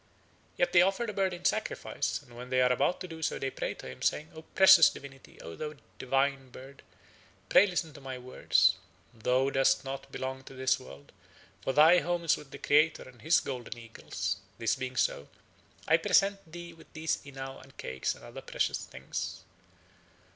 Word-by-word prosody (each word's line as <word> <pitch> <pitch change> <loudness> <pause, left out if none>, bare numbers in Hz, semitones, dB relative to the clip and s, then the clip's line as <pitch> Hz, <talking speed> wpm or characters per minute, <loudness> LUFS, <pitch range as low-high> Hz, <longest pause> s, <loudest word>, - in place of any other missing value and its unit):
Yet 175 0 +2
they 175 - +8
offer 195 +5 +2
the 215 - -4
bird 195 -1 +1
in 175 - -8
sacrifice, - - -1
and 120 - -17
when 125 +1 -9
they 130 0 +2
are 125 0 +4
about 140 +8 +1
to 185 - -5
do 160 -2 -9
so - - -1
they 135 - -3
pray - - -4
to - - -10
him, 65 - -10
saying: 155 +1 0
"O 160 - -9
precious 190 -1 +7
divinity, 135 -1 -12
O 80 - -8
thou 150 0 -6 0.2
divine 135 0 0
bird, 135 +2 -12 0.7
pray 205 - +7
listen 175 -4 -2
to 140 - -12
my 135 -1 -6
words. 95 -7 +2 0.4
Thou 125 +4 +1
dost 135 0 +2
not 135 0 -6
belong 130 0 -5
to 135 - -11
this 130 0 +1
world, 70 - -13 0.5
for 135 - -1
thy 160 +5 +7
home 175 0 -2
is 165 - +3
with 145 - -12
the - - -9
Creator 150 +2 +3
and 125 -3 -16
his 160 +3 +4
golden 125 -3 -6
eagles. 100 -4 -4 0.2
This 115 - +1
being 130 -1 -5
so, 100 - 0 0.6
I 160 - +5
present 195 0 +2
thee 170 0 -8
with 165 - -18
these 160 0 -1
inao 135 -1 -9
and 135 0 -18
cakes 65 0 -3
and - - -14
other - - -9
precious - - -1
things. - - -6
135 Hz, 190 wpm, -30 LUFS, 125-165 Hz, 0.7 s, they